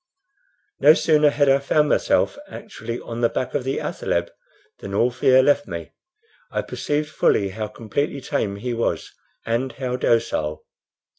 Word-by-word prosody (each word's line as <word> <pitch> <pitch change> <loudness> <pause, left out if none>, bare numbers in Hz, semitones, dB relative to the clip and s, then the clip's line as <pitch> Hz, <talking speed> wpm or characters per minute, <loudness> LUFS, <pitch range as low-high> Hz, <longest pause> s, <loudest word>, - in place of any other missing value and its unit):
No 155 - +7
sooner 150 -2 +4
had 145 0 +1
I 135 0 +5
found 150 +2 +2
myself - - +2
actually 115 +2 -7
on 115 0 -6
the 115 - +3
back 130 - -3
of 145 - -1
the 135 +1 -2
athaleb 85 0 -2 0.5
than 100 0 -6
all 120 +4 +3
fear 130 +1 +4
left 145 +2 +2
me. 85 -3 -6 0.6
I - - -2
perceived 150 +1 -2
fully 100 -9 +2
how 105 +2 -4
completely 140 +7 -3
tame 130 -7 -2
he 120 +5 -4
was, 115 0 -2 0.3
and 120 +3 -1
how 125 -2 -3
docile. 80 -11 0
125 Hz, 155 wpm, -22 LUFS, 110-140 Hz, 0.6 s, No